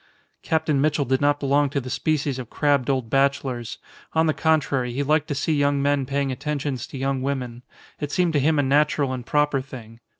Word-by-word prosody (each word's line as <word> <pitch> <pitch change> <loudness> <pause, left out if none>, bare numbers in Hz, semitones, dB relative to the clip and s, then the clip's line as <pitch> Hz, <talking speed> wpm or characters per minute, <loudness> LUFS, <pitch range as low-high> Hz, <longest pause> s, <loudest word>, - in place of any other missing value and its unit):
Captain 155 -3 0
Mitchell 150 -1 +1
did 130 +1 0
not 145 0 +2
belong 140 +1 +2
to 140 - -1
the 130 - -8
species 145 -2 -1
of 120 -3 -7
crabbed 140 -4 +1
old 130 -4 0
bachelors; 135 -3 0 0.4
on 160 0 +3
the 155 - +2
contrary, 140 -6 +1
he 140 +3 -1
liked 155 +2 +1
to 145 - -2
see 150 +3 0
young 145 -1 +2
men 140 -1 +1
paying 140 0 -1
attentions 140 -2 -3
to - - -8
young 135 0 -1
women. 130 -3 -3 0.4
It 145 -1 -4
seemed 175 -1 +1
to 145 - +3
him 155 +3 +2
a 145 - +3
natural 140 0 +2
and 125 -1 -5
proper 150 +1 +1
thing. 115 -4 -11
140 Hz, 205 wpm, -23 LUFS, 130-145 Hz, 0.4 s, on